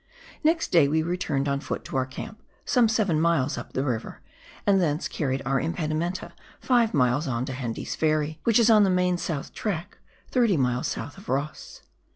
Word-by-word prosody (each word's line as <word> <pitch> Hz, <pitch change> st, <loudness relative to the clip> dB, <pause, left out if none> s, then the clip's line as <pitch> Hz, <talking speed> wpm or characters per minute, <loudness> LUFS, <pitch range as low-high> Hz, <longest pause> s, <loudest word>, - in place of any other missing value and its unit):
Next 320 Hz, +2 st, +2 dB
day 165 Hz, -5 st, +6 dB
we 160 Hz, +2 st, +1 dB
returned 155 Hz, -5 st, -1 dB
on 140 Hz, 0 st, 0 dB
foot -, -, -5 dB
to -, -, -7 dB
our 130 Hz, -1 st, +1 dB
camp, 220 Hz, +11 st, -8 dB, 0.2 s
some 245 Hz, -4 st, +3 dB
seven 200 Hz, -8 st, +1 dB
miles 160 Hz, -5 st, +2 dB
up -, -, -8 dB
the 130 Hz, -, 0 dB
river, 120 Hz, -5 st, -3 dB, 0.4 s
and 195 Hz, -2 st, +4 dB
thence 155 Hz, -1 st, 0 dB
carried 135 Hz, -3 st, -2 dB
our 135 Hz, +1 st, +1 dB
impedimenta 165 Hz, +2 st, -2 dB, 0.3 s
five 240 Hz, -3 st, +3 dB
miles 130 Hz, +3 st, +2 dB
on 125 Hz, -1 st, -1 dB
to 130 Hz, -, -5 dB
Hende's 120 Hz, -3 st, -4 dB
Ferry, 155 Hz, 0 st, 0 dB
which 230 Hz, -2 st, +4 dB
is 230 Hz, -1 st, +5 dB
on 215 Hz, -2 st, +7 dB
the 195 Hz, -, +3 dB
main 180 Hz, -1 st, +2 dB
south 155 Hz, -6 st, -4 dB
track, 185 Hz, -5 st, -4 dB, 0.3 s
30 235 Hz, -8 st, +3 dB
miles 125 Hz, -2 st, 0 dB
south 145 Hz, -, -5 dB
of 195 Hz, -, -13 dB
Ross. 140 Hz, +3 st, -4 dB
155 Hz, 190 wpm, -26 LUFS, 135-195 Hz, 0.4 s, on